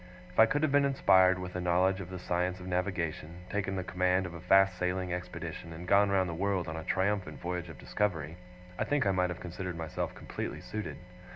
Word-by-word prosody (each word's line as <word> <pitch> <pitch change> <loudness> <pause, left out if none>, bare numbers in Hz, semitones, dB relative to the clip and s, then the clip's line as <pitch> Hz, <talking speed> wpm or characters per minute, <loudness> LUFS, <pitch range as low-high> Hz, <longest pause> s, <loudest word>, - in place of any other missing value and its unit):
If 90 - -5
I 110 - +9
could 145 +4 0
have 155 - +2
been 145 0 +5
inspired 95 -9 +5
with 90 -1 -6
a 90 - -1
knowledge 90 +2 +2
of 90 - -8
the 95 - -6
science 90 +1 -1
of 90 - -9
navigation, 90 -2 -2
taken 100 -1 -1
the 95 - -2
command 90 +1 +1
of 90 - -6
a 85 - -8
fast 95 +1 +5
sailing 90 0 -1
expedition, 90 -2 -6
and 85 +2 -8
gone 100 +1 +5
round 95 -2 +2
the 85 - -3
world 95 +1 0
on 80 - -4
a 80 - -5
triumphant 95 +2 0
voyage 90 0 -4
of 80 - -10
discovery, 85 -6 -2 0.4
I - - +2
think 145 -5 +1
I 100 - +3
might 90 -1 +1
have 90 - -5
considered 90 0 -5
myself 80 -1 -3
completely - - -5
suited. 110 0 -5
90 Hz, 220 wpm, -31 LUFS, 90-95 Hz, 0.4 s, I